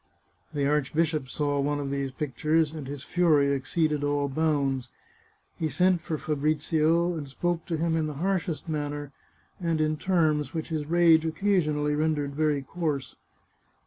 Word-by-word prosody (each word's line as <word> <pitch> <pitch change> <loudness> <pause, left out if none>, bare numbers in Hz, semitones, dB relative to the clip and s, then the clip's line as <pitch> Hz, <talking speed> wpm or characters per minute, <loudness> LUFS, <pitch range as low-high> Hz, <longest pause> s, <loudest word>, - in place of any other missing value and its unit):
The 145 -3 -1
archbishop 150 0 0
saw 145 +1 -1
one 145 +1 0
of 140 -1 -3
these 140 -1 -1
pictures, 150 +4 0
and 150 -4 -6
his 140 -1 -6
fury 155 -6 +3
exceeded 150 +2 0
all 145 0 +1
bounds. 135 -4 0 0.7
He 160 - 0
sent 180 +5 +2
for 160 -1 -3
Fabrizio, 155 +3 +1
and 145 -4 -6
spoke 170 +4 -2
to 165 -3 -1
him 165 +1 0
in 160 -1 0
the 150 - -5
harshest 175 0 -1
manner, 145 -2 -3 0.5
and 165 -3 0
in 155 0 +1
terms 155 -5 +1
which 160 +1 -3
his 155 -3 -3
rage 165 -1 +5
occasionally 160 -4 +1
rendered 150 -2 0
very 150 -1 +1
coarse. 150 -2 -3
155 Hz, 150 wpm, -27 LUFS, 145-165 Hz, 0.7 s, rage